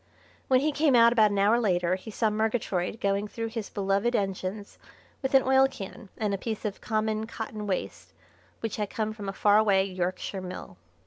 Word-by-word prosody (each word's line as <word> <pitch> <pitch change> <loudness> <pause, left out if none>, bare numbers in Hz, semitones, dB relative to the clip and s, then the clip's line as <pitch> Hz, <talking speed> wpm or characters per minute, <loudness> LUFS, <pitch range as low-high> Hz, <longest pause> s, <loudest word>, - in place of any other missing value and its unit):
When 260 -1 +4
he 305 +2 +1
came 290 -2 +3
out 235 0 +7
about 220 -3 +5
an 200 - -2
hour 210 +4 +4
later 180 -5 +1
he 185 +4 -5
saw 220 0 0
Murgatroyd 215 -2 -1
going 200 +1 0
through 225 +2 -4
his 225 -2 -5
beloved 200 +4 0
engines 195 0 -3 0.4
with 265 0 0
an 265 - +6
oil 265 0 +5
can 200 -4 -9
and 210 -2 -1
a 195 - -2
piece 220 0 -4
of 205 -1 -4
common 215 0 -1
cotton 215 -2 -6
waste 190 -2 -4 0.5
which 225 - -3
had 210 -2 -2
come 215 -1 -2
from 205 -3 -6
a - - -1
faraway 205 -1 +4
Yorkshire 185 +1 -3
mill. 180 - -8
210 Hz, 190 wpm, -27 LUFS, 195-225 Hz, 0.5 s, out